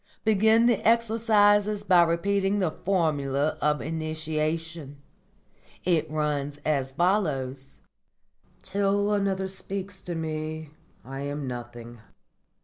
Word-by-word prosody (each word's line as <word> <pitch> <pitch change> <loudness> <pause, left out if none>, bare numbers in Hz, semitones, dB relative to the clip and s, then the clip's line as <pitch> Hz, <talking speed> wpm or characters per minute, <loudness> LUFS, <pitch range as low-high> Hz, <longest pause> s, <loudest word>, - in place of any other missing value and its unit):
Begin 220 +2 +4
the 235 -4 +3
exercises 215 -2 +3
by 185 -4 +5
repeating 195 +4 +1
the 185 -5 +1
Formula 155 -6 0
of 150 -4 +1
Initiation. 155 -1 -3 0.9
It 170 -4 +1
runs 145 -2 -2
as 140 -4 0
follows: 135 -7 -1 0.8
'_Till 200 +2 +1
another 195 -1 0
speaks 190 0 -5
to 175 - -5
me 155 -1 -4 0.3
I 135 +1 -7
am 145 +1 -4
nothing. 120 -1 -8
165 Hz, 100 wpm, -26 LUFS, 145-200 Hz, 0.9 s, by